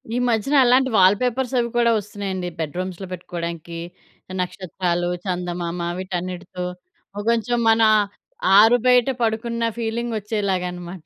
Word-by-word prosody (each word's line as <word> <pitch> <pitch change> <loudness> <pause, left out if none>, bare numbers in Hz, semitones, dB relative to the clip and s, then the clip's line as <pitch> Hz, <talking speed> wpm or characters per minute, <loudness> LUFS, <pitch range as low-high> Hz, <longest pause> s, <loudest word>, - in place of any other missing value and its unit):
ఈ - - +1
మధ్యన 235 +5 +1
అలాంటి 260 +2 +4
వాల్పేపర్స్ 245 +7 +3
అవి 235 - +1
కూడా 235 -1 +4
ఒస్తున్నాయండి, 195 -3 -5
బెడ్‌రూ‌మ్స్‌లో 180 +4 -4
పెట్టుకోవడానికి. 170 -2 -6 0.6
నక్షత్రాలు, 175 -1 -2 0.2
చందమామ 175 -1 -3 0.2
వీటన్నిటితో 180 -1 -5 0.6
కొంచేం 235 +1 +1
మన 225 0 +4 0.8
ఆరు 225 +3 +7
బయట 250 +1 +5
పడుకున్న 230 +1 -1
ఫీలింగొచ్చేలాగనమాట. 200 -7 -3
190 Hz, 100 wpm, -22 LUFS, 180-235 Hz, 0.8 s, ఆరు